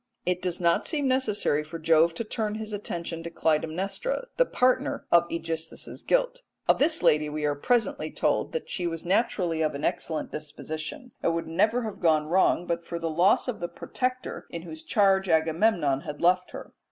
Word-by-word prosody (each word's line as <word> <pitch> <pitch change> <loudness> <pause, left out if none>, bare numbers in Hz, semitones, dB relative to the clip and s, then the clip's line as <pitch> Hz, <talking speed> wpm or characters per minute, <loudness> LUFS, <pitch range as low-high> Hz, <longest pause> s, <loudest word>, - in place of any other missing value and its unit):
It 180 0 0
does 180 -1 -2
not 170 -1 +2
seem 290 -4 0
necessary 215 - +1
for 155 +2 -7
Jove 165 +1 +3
to 230 - -3
turn 215 -1 -2
his 215 -1 -5
attention 170 -5 -4
to 170 - -6
Clytemnestra, 175 - -1
the - - +3
partner 250 0 +1
of 170 0 +5
AEgisthus's 165 -1 -4
guilt. - - +1 0.3
Of - - +4
this 315 +3 +3
lady 150 0 +4
we 150 0 -3
are 145 - +2
presently 230 - 0
told - - 0
that 480 - -3
she 175 -2 -2
was 165 -1 -4
naturally 180 -4 +1
of 155 -2 0
an 140 - -3
excellent 160 -2 -2
disposition, 155 - -7
and 165 - +1
would 165 - -2
never 220 +9 +1
have 215 -3 -5
gone 155 -3 +3
wrong 175 +1 +2
but 170 0 -2
for 170 - -5
the 165 -1 -2
loss 175 +10 +3
of 250 - -3
the 175 - -2
protector 255 +8 -4
in 170 -1 -6
whose 160 -2 -9
charge 195 +1 +2
Agamemnon 160 -2 +2
had 150 +1 -7
left 180 +1 +3
her. - - -9
170 Hz, 190 wpm, -27 LUFS, 160-215 Hz, 0.3 s, of